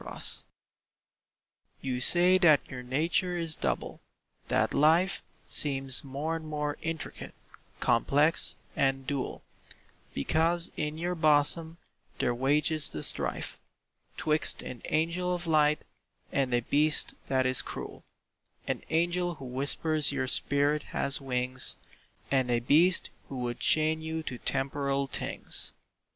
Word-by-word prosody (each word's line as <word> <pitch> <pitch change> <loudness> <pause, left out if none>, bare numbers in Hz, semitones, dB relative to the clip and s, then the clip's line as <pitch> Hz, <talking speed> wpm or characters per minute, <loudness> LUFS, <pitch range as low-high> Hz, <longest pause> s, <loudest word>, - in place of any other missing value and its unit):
DUAL - - -8 1.6
You 125 -2 -3
say 180 +6 +5
that 155 -6 +4
your 125 -1 -6
nature 165 +8 0
is 165 -2 0
double; 65 -3 -3 0.5
that - - +1
life 165 +6 +3 0.3
Seems 135 -3 +4
more 145 +4 -3
and 160 -1 -6
more 150 -1 -3
intricate, 165 -1 -5 0.4
complex, 145 +7 +2 0.2
and 135 -1 +1
dual, 140 -1 -3 0.7
Because 165 - +1
in 150 0 -3
your 175 +2 -2
bosom 160 +1 +2 0.4
there 120 - +1
wages 145 +4 +1
the 75 - -5
strife - - -1 0.6
'Twixt 155 0 +1
an 120 - -8
angel 170 +3 0
of 175 0 -5
light 150 -2 +3 0.5
and 135 -2 0
a 120 0 +2
beast 150 +5 +2
that 130 -1 +1
is 130 -1 +2
cruel— - - -8 0.6
An - - -2
angel 175 +1 0
who 135 - -10
whispers 145 +4 0
your 135 -2 -2
spirit 145 +3 +2 0.2
has 140 +1 +1
wings, 130 -1 -1 0.6
And 130 -2 +2
a 120 -1 +2
beast 160 +9 +3 0.2
who 135 - -6
would 120 -1 -3
chain 155 0 +2
you 160 0 -4
to 125 -5 -5
temporal 140 0 -1
things. - - -4
150 Hz, 125 wpm, -29 LUFS, 135-160 Hz, 1.6 s, say